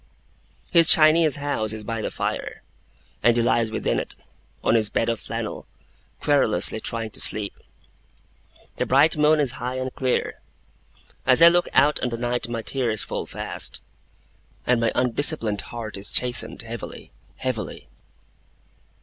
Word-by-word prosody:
His 165 Hz, -2 st, +6 dB
Chinese 155 Hz, -1 st, +6 dB
house 140 Hz, -7 st, -2 dB
is 110 Hz, -1 st, -7 dB
by 115 Hz, +1 st, -4 dB
the -, -, -3 dB
fire; -, -, -4 dB, 0.6 s
and 120 Hz, +1 st, +3 dB
he 120 Hz, -, +2 dB
lies 115 Hz, -1 st, +1 dB
within 110 Hz, -, -1 dB
it, -, -, -3 dB, 0.5 s
on -, -, +2 dB
his 110 Hz, -2 st, +2 dB
bed 115 Hz, -, 0 dB
of 115 Hz, -, -2 dB
flannel, -, -, -6 dB, 0.5 s
querulously 130 Hz, -8 st, +1 dB
trying 115 Hz, -1 st, -3 dB
to -, -, -8 dB
sleep. 105 Hz, -2 st, -2 dB, 1.2 s
The -, -, -1 dB
bright 140 Hz, +5 st, +4 dB
moon 150 Hz, 0 st, +3 dB
is 140 Hz, -5 st, +1 dB
high 125 Hz, +1 st, -3 dB
and 130 Hz, 0 st, -4 dB
clear. 130 Hz, -1 st, -2 dB, 0.9 s
As 130 Hz, +5 st, +7 dB
I 170 Hz, -, +10 dB
look 175 Hz, +1 st, +1 dB
out 145 Hz, +3 st, +3 dB
on 125 Hz, -, -2 dB
the 115 Hz, -, -4 dB
night, 120 Hz, 0 st, -2 dB
my 115 Hz, -1 st, -4 dB
tears 120 Hz, -3 st, 0 dB
fall -, -, -5 dB
fast, -, -, -2 dB, 0.8 s
and 125 Hz, -2 st, +2 dB
my 115 Hz, -, +1 dB
undisciplined 125 Hz, -4 st, 0 dB
heart 115 Hz, -4 st, -7 dB
is 100 Hz, -, -7 dB
chastened 120 Hz, -2 st, +1 dB
heavily 115 Hz, +1 st, -8 dB, 0.2 s
heavily. 130 Hz, -4 st, -5 dB
120 Hz, 150 wpm, -23 LUFS, 115-140 Hz, 1.2 s, I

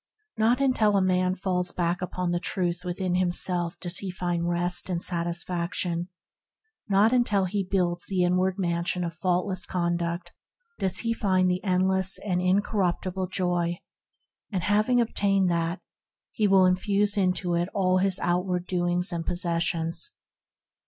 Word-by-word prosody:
Not 230 Hz, +3 st, +2 dB
until 225 Hz, -7 st, +3 dB
a -, -, +4 dB
man 185 Hz, 0 st, +1 dB
falls 180 Hz, -1 st, -1 dB
back 175 Hz, 0 st, -1 dB
upon 180 Hz, -1 st, -2 dB
the 175 Hz, -, 0 dB
Truth 175 Hz, -2 st, -2 dB
within 180 Hz, 0 st, -2 dB
himself 175 Hz, -1 st, -1 dB
does 175 Hz, -1 st, -2 dB
he 195 Hz, -, -5 dB
find 175 Hz, -2 st, -2 dB
rest 175 Hz, +2 st, +1 dB
and 175 Hz, -2 st, -1 dB
satis 170 Hz, -1 st, 0 dB
faction; 175 Hz, 0 st, -2 dB, 0.8 s
not 205 Hz, +4 st, +4 dB
until 210 Hz, -6 st, +2 dB
he 195 Hz, +2 st, -1 dB
builds 180 Hz, -2 st, 0 dB
the 185 Hz, -2 st, +1 dB
inward 185 Hz, +1 st, +1 dB
Mansion 175 Hz, -1 st, -1 dB
of 170 Hz, -1 st, -3 dB
Faultless 180 Hz, +2 st, -1 dB
Conduct 170 Hz, 0 st, -2 dB, 0.5 s
does 190 Hz, -2 st, 0 dB
he 230 Hz, -1 st, 0 dB
find 185 Hz, -4 st, +2 dB
the 180 Hz, +1 st, -2 dB
endless 190 Hz, 0 st, +2 dB
and 180 Hz, -3 st, -2 dB
incorruptible 185 Hz, -1 st, 0 dB
Joy; 175 Hz, -2 st, -1 dB, 0.7 s
having 210 Hz, +6 st, +2 dB
obtained 195 Hz, -5 st, +1 dB
that, 170 Hz, +2 st, -1 dB, 0.5 s
he 215 Hz, -3 st, +1 dB
will 190 Hz, -1 st, +5 dB
infuse 200 Hz, +3 st, +2 dB
it 200 Hz, -, +2 dB
into 180 Hz, -1 st, 0 dB, 0.2 s
all 185 Hz, -2 st, +2 dB
his 190 Hz, 0 st, +2 dB
outward 180 Hz, 0 st, 0 dB
doings 180 Hz, 0 st, 0 dB
and 170 Hz, -1 st, -3 dB
possessions. 170 Hz, -, -1 dB
180 Hz, 145 wpm, -26 LUFS, 175-195 Hz, 0.8 s, will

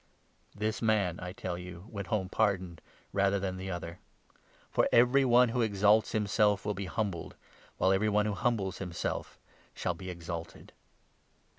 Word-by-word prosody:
This 110 Hz, +2 st, -2 dB
man, 105 Hz, -6 st, +1 dB
I 90 Hz, 0 st, -5 dB
tell 90 Hz, -1 st, -5 dB
you, 90 Hz, 0 st, -9 dB
went 100 Hz, -4 st, -6 dB
home 100 Hz, -4 st, 0 dB
pardoned, 95 Hz, -5 st, 0 dB, 0.3 s
rather 100 Hz, 0 st, +2 dB
than 95 Hz, -1 st, -3 dB
the 95 Hz, +1 st, -6 dB
14 -, -, -3 dB
other; 85 Hz, 0 st, -7 dB, 0.7 s
for -, -, +2 dB
every 125 Hz, +3 st, +5 dB
one 125 Hz, -1 st, +5 dB
who 120 Hz, +2 st, 0 dB
exalts 105 Hz, 0 st, +3 dB
himself 105 Hz, -1 st, +2 dB
will 105 Hz, -, 0 dB
be 100 Hz, 0 st, -4 dB
humbled, 95 Hz, -3 st, -3 dB, 0.4 s
while 95 Hz, -, +3 dB
every 100 Hz, +3 st, +2 dB
one 105 Hz, 0 st, +2 dB
who 105 Hz, -, 0 dB
humbles 100 Hz, -3 st, -1 dB
himself 90 Hz, -3 st, -4 dB, 0.4 s
shall 90 Hz, -, -1 dB
be 95 Hz, +2 st, -8 dB
exalted." 85 Hz, -1 st, -7 dB
100 Hz, 160 wpm, -31 LUFS, 90-110 Hz, 0.7 s, every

